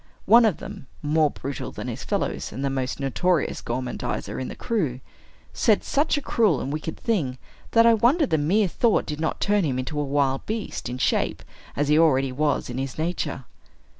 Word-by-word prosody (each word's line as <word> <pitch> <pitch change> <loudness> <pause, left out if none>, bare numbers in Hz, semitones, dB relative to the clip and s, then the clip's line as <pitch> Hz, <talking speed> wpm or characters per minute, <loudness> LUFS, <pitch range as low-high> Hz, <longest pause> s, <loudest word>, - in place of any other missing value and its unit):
One 230 +4 +7
of 205 -8 +2
them - - -9 0.2
(more 150 0 +3
brutal 140 0 -6
than - - -7
his - - -5
fellows, - - -2
and 135 +6 -4
the 135 - 0
most 130 0 -2
notorious 155 +5 0
gormandizer 125 +1 -3
in 130 - -3
the - - -7
crew) 160 - -1 0.5
said - - +2
such 290 +2 +1
a 290 - -3
cruel 210 - +2
and 140 - -3
wicked 155 +1 -4
thing, 155 - -1 0.4
that 230 0 +6
I 230 - +7
wonder 255 +9 +3
the 160 - +1
mere 190 +8 +2
thought 225 +5 +2
did 150 0 -5
not 160 - -1
turn 205 -1 +2
him 135 -5 0
into 150 +4 -3
a - - 0
wild 140 -1 0
beast, 215 - -4
in 125 - -4
shape, - - 0 0.3
as 145 +1 0
he 150 +1 +4
already 135 -5 +3
was 145 +2 0
in 125 +1 -4
his 135 -1 -4
nature. 155 -5 -2
150 Hz, 195 wpm, -24 LUFS, 135-205 Hz, 0.5 s, One